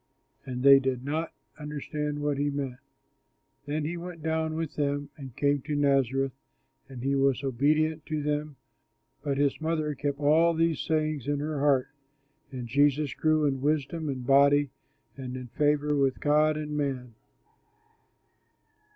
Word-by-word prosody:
But 125 -1 -4
they 140 0 +9
did 130 -2 -2
not 155 +3 -2 0.3
understand 150 0 -4
what 145 -1 0
he 145 0 +1
meant. 135 -3 -4 0.9
Then 150 +1 -2
he 170 +3 -3
went 170 -2 -8
down 160 0 -1
with 160 -2 -4
them 145 -1 -1
and 135 -6 -10
came 145 0 +1
to 150 +2 -3
Nazareth; 135 -2 +2 0.6
and 125 -2 -8
he 135 +1 +1
was 135 -1 +2
obedient 150 +4 +1
to 155 -1 -2
them; 150 0 -2 0.7
but 140 -2 -2
his 140 +1 +1
mother 155 -2 -1
kept 140 0 -3
all 160 +3 +4
these 165 -1 +1
sayings 155 -4 -1
in 145 0 0
her 150 0 -3
heart. 135 -2 +2 0.6
And 125 -2 -5
Jesus 145 +2 +2
grew 155 -1 +2
in 135 -2 0
wisdom 155 +2 -1
and 130 -2 -4
body 140 +1 +4 0.5
and 130 -1 -6
in 125 -1 -8
favor 150 +2 +1
with 135 -2 +1
God 150 +1 +3
and 150 -1 -4
man. 130 -5 -3
145 Hz, 150 wpm, -28 LUFS, 135-155 Hz, 0.9 s, they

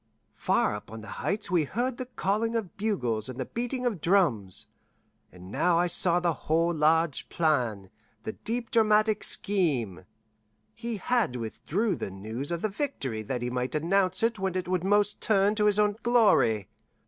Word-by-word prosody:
Far - - +1
up 105 - -8
on 110 0 -8
the 110 - -11
Heights 205 -1 -2
we 175 -3 +3
heard 240 - -2
the 255 - -5
calling 225 0 -1
of 220 -4 -3
bugles 130 - -1
and 130 0 -7
the 130 - -2
beating 245 +2 -3
of 215 -10 -1
drums; 145 - +1 0.7
and 90 +1 -12
now 175 +7 +2
I 175 - +3
saw 175 0 +2
the 175 -1 +1
whole 165 +3 0
large 160 -1 +2
plan, 120 - 0 0.3
the 220 - -4
deep 230 +2 -4
dramatic 215 -1 +3
scheme. 130 - +1 0.7
He 230 0 -5
had 225 - 0
withheld 165 - -2
the - - -4
news 110 - -6
of 170 -1 -3
the - - +3
victory 140 - -3
that 120 +3 -4
he 125 - -2
might 125 +3 -2
announce 185 +5 +1
it 230 -2 +1
when 190 -1 -2
it 185 -1 -2
would 180 -1 0
most 205 +1 +1
turn 205 -1 +3
to 210 -1 +1
his 210 -1 +4
own 210 -1 +2
glory. 210 - +3
180 Hz, 175 wpm, -28 LUFS, 125-215 Hz, 0.7 s, his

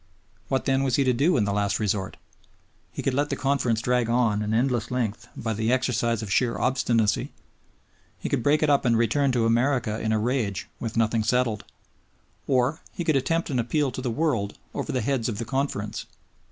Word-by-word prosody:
What 135 -1 -1
then 135 0 +2
was 135 -3 +1
he 140 - +3
to 130 -1 +2
do 145 +9 +2
in 105 - +2
the 100 - -1
last 100 0 0
resort? 100 -3 -1 0.7
He - - -6
could 135 - +1
let 145 +2 0
the - - -1
Conference 130 -5 0
drag 125 -2 +1
on 115 -3 +2
an 105 0 -2
endless 120 0 +1
length 120 -2 -2
by 115 -1 -2
the 110 +2 0
exercise 120 -3 +1
of 100 - -6
sheer 120 -3 +2
obstinacy. 115 -5 +1 0.9
He - - -5
could - - 0
break 150 +5 +3
it 155 - +3
up 140 - +3
and 120 -3 +3
return 125 +5 +2
to 120 -2 +2
America 120 -1 +1
in 110 - -1
a 110 - +2
rage 110 -3 -1
with 115 -1 -4
nothing 115 0 +2
settled. 120 -2 0 0.8
Or 130 +3 +1
he 175 - -4
could 160 -3 +2
attempt 165 +5 0
an 130 - 0
appeal 135 +4 0
to 130 - -5
the 125 - -2
world 120 -6 -1 0.2
over - - -3
the 130 - 0
heads 125 0 0
of 105 - -3
the 115 - -3
Conference. 110 -4 -3
120 Hz, 205 wpm, -25 LUFS, 110-135 Hz, 0.9 s, he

